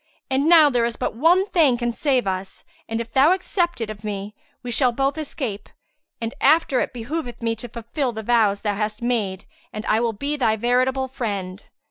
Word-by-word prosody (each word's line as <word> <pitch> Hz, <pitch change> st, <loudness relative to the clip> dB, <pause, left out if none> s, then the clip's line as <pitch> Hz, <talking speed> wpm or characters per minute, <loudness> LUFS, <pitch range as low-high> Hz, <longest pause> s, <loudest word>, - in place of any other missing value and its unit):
And 275 Hz, +4 st, +2 dB
now 325 Hz, -3 st, +8 dB
there 245 Hz, -2 st, +2 dB
is 235 Hz, 0 st, -1 dB
but -, -, -2 dB
one 335 Hz, -, +4 dB
thing 310 Hz, -11 st, +3 dB
can 240 Hz, 0 st, -1 dB
save 260 Hz, -1 st, +1 dB
us 190 Hz, 0 st, -4 dB, 0.2 s
and, 225 Hz, 0 st, -2 dB
if 230 Hz, -1 st, -6 dB
thou 285 Hz, +6 st, +5 dB
accept 355 Hz, -4 st, -1 dB
it 220 Hz, -1 st, -3 dB
of 210 Hz, 0 st, -11 dB
me, 205 Hz, -1 st, -5 dB, 0.3 s
we 245 Hz, -, -4 dB
shall 250 Hz, +1 st, +3 dB
both 270 Hz, +3 st, 0 dB
escape; 260 Hz, -9 st, -5 dB, 0.5 s
and 230 Hz, 0 st, -4 dB
after 285 Hz, -3 st, +4 dB
it -, -, -1 dB
behoveth 245 Hz, +1 st, -5 dB
thee 230 Hz, -1 st, -1 dB
to 245 Hz, -, -8 dB
fulfil 240 Hz, +4 st, -3 dB
the 220 Hz, -1 st, -6 dB
vows 215 Hz, -3 st, +2 dB
thou 205 Hz, -2 st, 0 dB
hast 215 Hz, +2 st, -3 dB
made 210 Hz, -6 st, -1 dB, 0.3 s
and 215 Hz, 0 st, -6 dB
I 220 Hz, -, +2 dB
will 230 Hz, -1 st, 0 dB
be 285 Hz, +8 st, -3 dB
thy 225 Hz, -5 st, +2 dB
veritable 255 Hz, +3 st, +1 dB
friend." 205 Hz, -7 st, -4 dB
240 Hz, 200 wpm, -22 LUFS, 215-275 Hz, 0.5 s, now